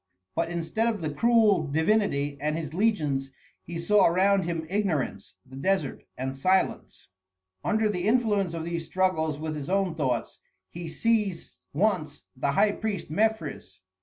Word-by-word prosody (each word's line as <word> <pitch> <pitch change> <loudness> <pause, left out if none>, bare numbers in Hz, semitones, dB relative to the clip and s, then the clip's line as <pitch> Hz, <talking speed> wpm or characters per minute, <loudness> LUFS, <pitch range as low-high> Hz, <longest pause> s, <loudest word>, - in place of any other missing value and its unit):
But 165 0 -1
instead 175 +7 -1
of 220 -5 -1
the 155 -2 -2
cruel 215 -3 +4
divinity 155 -2 +1
and 150 +1 0
his 155 -2 -5
legions 155 -10 +1 0.3
he 170 - -7
saw 200 +4 +4
around 190 +2 +3
him 165 -2 -2
ignorance, 160 - -2
the 130 - -13
desert, 185 0 -1
and 130 +1 -3
silence. 185 +7 0 0.5
Under 220 0 +2
the 185 -2 -1
influence 210 -7 +2
of 165 - -4
these 170 0 -3
struggles 165 -4 0
with 155 0 -3
his 150 0 -5
own 195 -2 +1
thoughts, 130 -7 -2 0.3
he 170 0 -6
seized 210 -1 -1
once 160 -4 0
the 140 +2 0
high 210 +7 +4
priest 205 -6 -4
Mefres. 165 - -1
170 Hz, 150 wpm, -27 LUFS, 150-205 Hz, 0.5 s, cruel